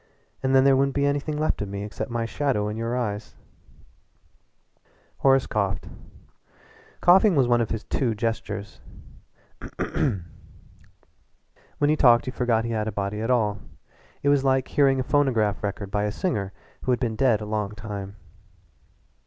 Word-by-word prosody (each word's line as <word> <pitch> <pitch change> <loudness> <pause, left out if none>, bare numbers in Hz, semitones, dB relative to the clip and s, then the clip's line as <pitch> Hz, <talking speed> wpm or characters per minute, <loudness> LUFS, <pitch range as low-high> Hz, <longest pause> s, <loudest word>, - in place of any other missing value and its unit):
And 130 0 +1
then 130 - +6
there 135 0 +5
wouldn't 135 0 +1
be 140 0 +2
anything 145 +1 -1
left 155 -6 0
of 105 - -3
me 100 0 -5
except 105 +3 -5
my 115 -1 -2
shadow 120 -5 -1
in 105 - -4
your 115 +2 -2
eyes." 105 -3 -4 1.8
Horace 135 -1 +4
coughed. 100 -3 -2 1.1
Coughing 190 +2 +6
was 135 -4 +3
one 120 -1 +3
of 115 - -1
his 115 -2 -3
two 120 -5 -1
gestures. 105 -2 -4 1.0
When 95 -3 -1 1.7
he 155 - +4
talked 120 -5 +5
you 130 - -4
forgot 115 -3 +1
he 115 - -3
had 110 -1 -1
a - - -1
body 100 +1 -3
at 115 - -2
all. 105 -5 +1 0.6
It 140 - +3
was 145 -1 +3
like 130 -1 +1
hearing 135 -2 +3
a - - 0
phonograph 125 -8 +1
record 100 -1 -4
by 105 +1 0
a 105 - -1
singer 105 - -2 0.3
who 130 - -1
had 125 - +1
been 115 -4 -1
dead 120 -3 +3
a 105 - -6
long 105 -1 -3
time. 100 -2 -7
115 Hz, 160 wpm, -25 LUFS, 105-135 Hz, 1.8 s, then